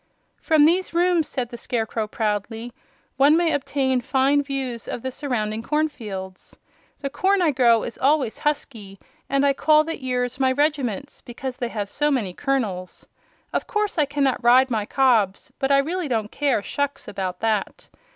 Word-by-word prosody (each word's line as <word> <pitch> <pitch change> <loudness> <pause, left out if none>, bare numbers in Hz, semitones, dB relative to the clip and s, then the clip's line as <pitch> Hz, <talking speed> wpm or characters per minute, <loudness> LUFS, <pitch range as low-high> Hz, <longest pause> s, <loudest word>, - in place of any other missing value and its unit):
"From 310 -3 +4
these 350 +2 +1
rooms," 345 -2 +2
said 245 -3 -3
the 235 - -9
Scarecrow, 225 -2 -2
proudly, 220 +2 -3 0.4
"one 285 +4 +5
may 340 -1 +2
obtain 270 -2 0
fine 270 +3 +2
views 270 -4 -4
of 235 - -5
the 260 - -3
surrounding 225 -6 -2
cornfields. 220 -11 -4 0.4
The 280 - -2
corn 390 +6 +2
I 340 -4 +3
grow 240 -4 +4
is 235 - -7
always 275 -4 +1
husky, 225 -10 -3 0.3
and 275 0 +2
I 280 - +4
call 305 +2 +4
the 325 -3 -6
ears 250 0 -2
my 260 -1 +3
regiments, 285 -3 -1
because 250 +1 -6
they 240 - -3
have 210 -3 -3
so 295 +8 0
many 230 -10 -1
kernels. 210 -9 -3 0.5
Of - - -1
course 420 -5 -1
I 300 - +4
cannot 275 -3 0
ride 255 +2 +5
my 215 -3 -1
cobs, 230 -8 +2
but 270 +1 0
I 275 - +6
really 330 +5 -1
don't 220 -5 -2
care 275 -8 0
shucks 285 +4 -3
about 185 -2 -4
that. 215 -3 -1
260 Hz, 170 wpm, -23 LUFS, 225-290 Hz, 0.5 s, I